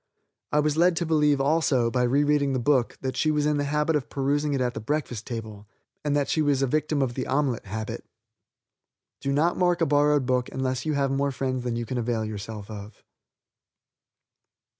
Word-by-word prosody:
I 150 - +3
was 150 0 0
led 175 +1 +4
to 170 - -1
believe, 150 -3 +3
also, 135 -5 +2
by 125 - +1
rereading 140 +2 +2
the - - +1
book, 130 -1 +1
that 130 -1 -3
she 155 - +1
was 150 -1 +1
in 150 -1 +2
the 145 - 0
habit 150 +2 +1
of 145 -4 -2
perusing 145 +1 0
it - - -1
at 125 -1 0
the - - -5
breakfast 120 -1 -3
table, 110 -4 -7 0.4
and 145 -1 0
that 145 -1 +1
she 160 - +1
was 145 -2 +2
a - - +4
victim 150 +1 0
of 125 -2 -2
the 130 0 -4
omelet 135 -4 0
habit. 110 +2 -5 1.2
Do 140 - -2
not 155 +5 +2
mark 175 -1 +2
a 165 - +3
borrowed 145 -1 +3
book 125 -1 0
unless 130 +1 -2
you 155 - +1
have 140 -1 +1
more 140 +1 0
friends 130 -1 -2
than 120 -2 -2
you 120 0 -3
can 125 +2 -3
avail 115 -2 -1
yourself 105 0 -7
of. 105 0 -10
135 Hz, 205 wpm, -26 LUFS, 120-150 Hz, 1.2 s, led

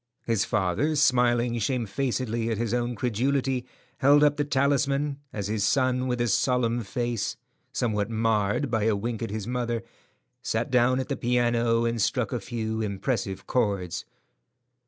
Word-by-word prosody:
His 115 -4 +1
father, 105 - 0
smiling 120 -4 +3
shamefacedly 120 0 -1
at 115 - -1
his 115 0 -1
own 120 0 -1
credulity, 125 +3 0 0.3
held 145 +2 +6
up 145 -1 +4
the 145 - 0
talisman, 140 0 +1
as 100 -2 -4
his 105 -1 -1
son, 130 +2 +2
with 125 -1 -1
a 120 - +1
solemn 120 +1 +1
face, 120 0 -2 0.3
somewhat 110 -5 -1
marred 110 +2 +1
by 110 -3 +1
a 110 -2 +3
wink 115 +2 -3
at 115 - -2
his 105 0 -4
mother, 120 -1 -2 0.6
sat - - -2
down 125 +1 +3
at 130 - -3
the 140 - -1
piano 120 -1 +1
and 115 -1 0
struck 115 +3 0
a 125 - -1
few 110 0 -3
impressive 100 -1 -2
chords. 100 -8 -1
120 Hz, 155 wpm, -26 LUFS, 110-130 Hz, 0.6 s, held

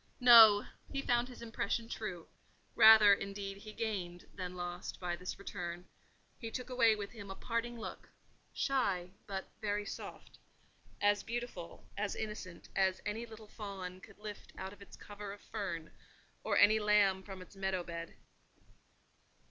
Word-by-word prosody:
No! 225 -4 +9 0.3
he 275 0 -2
found 240 0 +2
the 250 -2 -10
impression 225 0 -2
true—rather, 215 +1 +4
indeed, 195 0 -4
he 215 +1 -10
gained 195 -6 -4
than 180 -1 -5
lost 175 0 -5
by 175 -1 -2
this 180 +1 -6
return: 180 -3 -6 0.5
he 230 - -5
took 250 +2 -5
away 230 -3 +5
with 205 -1 -6
him 205 -4 -9
a 195 - -5
parting 235 +2 -3
look—shy, 200 -4 -3 0.2
but 195 -1 -5
very 205 -1 -1
soft—as 205 0 -4
beautiful, 235 -7 -6
as 205 0 -2
innocent, 210 -5 -6
as 190 -1 +2
any 225 +3 -3
little 220 -1 -11
fawn 190 -4 -7
could - - -14
lift 210 -1 -9
out 190 +1 -5
of 200 - -17
its 200 - -12
cover 205 -1 -8
of 205 - -12
fern, 175 -7 -5 0.5
or - - +1
any 215 +2 +6
lamb 205 -2 +4
from 190 -1 -9
its 185 +2 -13
meadow 190 -2 -1
bed. 170 -1 -7
205 Hz, 145 wpm, -34 LUFS, 185-220 Hz, 0.5 s, No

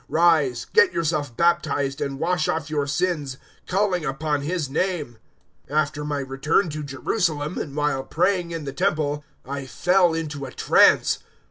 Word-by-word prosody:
Rise, 155 -7 +3
get 450 -5 +5
yourself 150 -6 -1
baptized, 145 -4 +1
and 135 -1 -2
wash 170 0 0
off 155 -1 -2
your 145 -2 0
sins, 145 -3 -1 0.3
calling 190 -2 +1
upon 150 +1 -1
His 160 +1 -2
name.' 150 -5 -2 0.5
022:017 150 - -2
"After 150 0 0
my 150 -1 -2
return 135 +7 0
to 155 0 -5
Jerusalem, 150 +2 -1
and 140 -2 -5
while 150 -3 0
praying 180 +2 0
in 165 -2 -5
the 135 - -5
Temple, 145 +1 0 0.2
I 140 0 -5
fell 175 +5 +3
into 150 -4 -4
a - - -9
trance. - - +4
150 Hz, 155 wpm, -23 LUFS, 140-170 Hz, 0.5 s, get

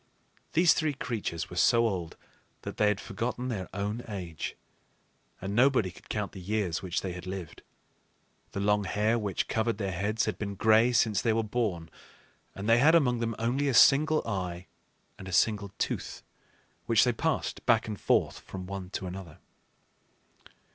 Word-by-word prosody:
These 170 +1 +6
three 155 -2 0
creatures 110 -10 -4
were - - -7
so 115 +4 +4
old 90 -6 -4 0.5
that - - -6
they 105 - +3
had 105 -1 +1
forgotten 120 +4 -3
their 100 -6 -4
own 105 +4 -3
age, 90 -7 -5 0.8
and 95 +2 -4
nobody 125 -6 +3
could - - -18
count 105 -2 -2
the 95 - -9
years 95 -3 -1
which 90 -2 -2
they 95 -2 -4
had 90 +1 -8
lived. 95 -4 -6 0.9
The 100 - -2
long 105 0 +2
hair 110 +4 +1
which 100 -3 -2
covered 110 -1 0
their 100 -2 -2
heads 100 +5 -1
had - - -3
been 100 -1 -4
gray 110 +4 +4
since 110 -4 +2
they 115 - +2
were 115 0 +1
born; 105 -7 -2 0.7
and 100 +2 -5
they 115 +1 +5
had 160 +5 +6
among 125 -7 +3
them 115 -1 -2
only 125 +5 0
a 135 - +1
single 155 +6 +5
eye 90 -4 -3 0.5
and 95 - -9
a - - -6
single 100 +1 +2
tooth - - -3 0.6
which 115 -2 +5
they 125 - +2
passed 160 +6 -2
back 115 -3 +4
and 105 -2 -6
forth - - +1
from 95 -1 -8
one 95 -1 -6
to - - -3
another. 90 -3 -8
105 Hz, 175 wpm, -29 LUFS, 95-115 Hz, 0.9 s, These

